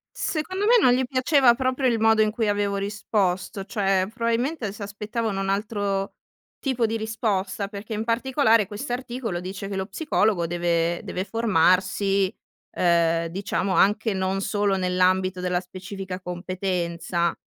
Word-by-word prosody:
Secondo 370 +6 -2
me 480 - +6
non 250 -9 +5
gli 260 +1 +2
piaceva 255 -1 +4
proprio 260 +1 0
il 230 -2 +1
modo 220 0 +4
in 215 - +3
cui 220 0 -1
avevo 205 -1 0
risposto, 200 -1 -1
cioè 195 -4 +1
probabilmente 235 0 -1
si 210 0 -8
aspettavano 210 0 -3
un 195 - -2
altro 200 -1 -1 0.5
tipo 255 -4 0
di 225 +1 -1
risposta, 210 -3 -2
perché 205 +2 -7
in 215 - -2
particolare 230 -2 +2
questo 230 +5 -5
articolo 245 -6 -4
dice 190 +2 -6
che 200 - -5
lo 190 +1 -2
psicologo 205 - +1
deve 170 0 0
deve 185 - -3
formarsi, 195 -2 +2 0.5
ehm, 170 -1 +3
diciamo, 190 +1 -2
anche 210 +2 +3
non 190 0 -1
solo 205 -1 +1
nell'ambito 185 0 +1
della 180 -1 0
specifica 185 0 -7
competenza, 175 -1 -2
200 Hz, 145 wpm, -24 LUFS, 185-225 Hz, 0.5 s, me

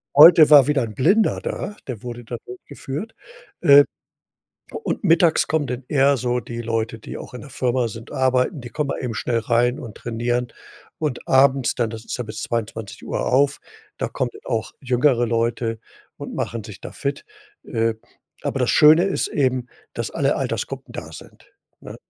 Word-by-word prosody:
Heute 155 +1 +9
war 145 -3 +8
wieder 145 -3 +2
'n 110 -2 -6
Blinder 195 - +2
da, 205 - -4
der 120 -5 -6
wurde 120 -1 -7
da 120 +1 -6
durchgeführt, 140 - -7 0.5
äh. 140 0 +8 1.0
Und - - -3
mittags 165 -2 +4
kommen 155 -2 0
dann 125 0 -5
eher 140 -1 +3
so 125 -1 -1
die 120 0 -6
Leute, 115 0 -2
die - - -8
auch - - -10
in 125 - -8
der 140 - -11
Firma 125 -1 0
sind 115 +1 -10
arbeiten, 130 +3 +1
die 120 - -8
kommen 145 +4 -3
mal - - -3
eben 120 -3 -4
schnell 115 +1 0
rein 120 +3 +1
und 115 -7 -9
trainieren. 120 +1 -2 0.5
Und 150 -5 -3
abends 135 -1 +4
dann, 120 -3 -1
das 110 0 -8
ist - - -4
ja 125 - -1
bis 110 0 -7
22:00 110 -2 -4
auf, 140 +2 +2 0.4
da - - -2
kommen 125 - -2 0.2
auch 115 -2 -2
jüngere 125 -1 +2
Leute 115 0 -1 0.4
und - - -7
machen 115 -1 -3
sich 100 -1 -11
da - - -8
fit. 140 0 -4 0.4
Äh, 115 0 -1 0.5
aber - - -2
das - - +1
Schöne 155 +4 +6
ist 195 - -1
eben, 130 -3 0 0.3
dass - - -4
alle - - +1
Altersgruppen - - -4
da - - -7
sind, - - -14 0.3
ne? - - -10
125 Hz, 175 wpm, -22 LUFS, 115-140 Hz, 1.0 s, Heute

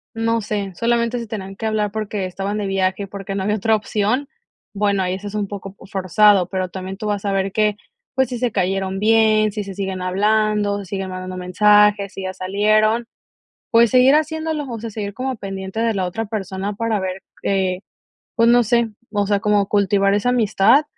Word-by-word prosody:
no 230 0 0
sé, 200 -2 -3
solamente 235 +3 0
se 230 - -6
tenían 195 -3 -6
que 220 - -3
hablar 210 -2 0
porque 210 -2 -3
estaban 195 +3 -3
de 210 - -2
viaje, 195 +1 0
porque 195 0 -6
no 190 - -2
había 210 +2 0
otra 220 +2 +2
opción, 215 +5 -1 0.5
bueno, 200 -1 +1
ahí 180 0 -1
eso 195 +2 -6
es 205 - -7
un 205 -1 -1
poco 195 -1 -8
p - - -15
forzado, 195 0 +3
pero 185 -1 -2
también 190 +1 -6
tú 215 - -6
vas 205 -1 -2
a 200 - +1
ver 195 0 0
que, 210 0 +1 0.4
pues, 265 0 +2
si 245 - -3
se 245 -1 0
cayeron 190 0 -1
bien, 215 0 +4
si 210 - -3
se 195 -1 -7
siguen 190 -1 -4
hablando, 205 +2 +1
si 200 - -7
siguen 190 0 -4
mandando 185 0 -6
mensajes, 205 +2 +4
si 195 - -6
ya 185 0 -3
salieron, 215 +5 +1 0.6
pues, 230 -1 +5
seguir 255 +3 +6
haciéndolo, 315 -1 -1
o 230 - -4
sea, 225 +1 -6
seguir 205 -1 -5
como 255 +1 -3
pendiente 195 +1 -5
de 230 -2 +1
la 190 -2 -1
otra 220 +5 -3
persona 200 -1 -4
para 225 -1 -1
ver, 190 0 -4 0.2
eh, 190 -2 0 0.5
pues, 230 0 +4
no 240 0 +5
sé, 235 +1 +2 0.2
o 205 -1 +1
sea, 205 -1 +2
como 210 -2 +2
cultivar 200 -1 +2
esa 210 +4 +1
amistad, 230 +4 +4
205 Hz, 205 wpm, -20 LUFS, 195-220 Hz, 0.6 s, seguir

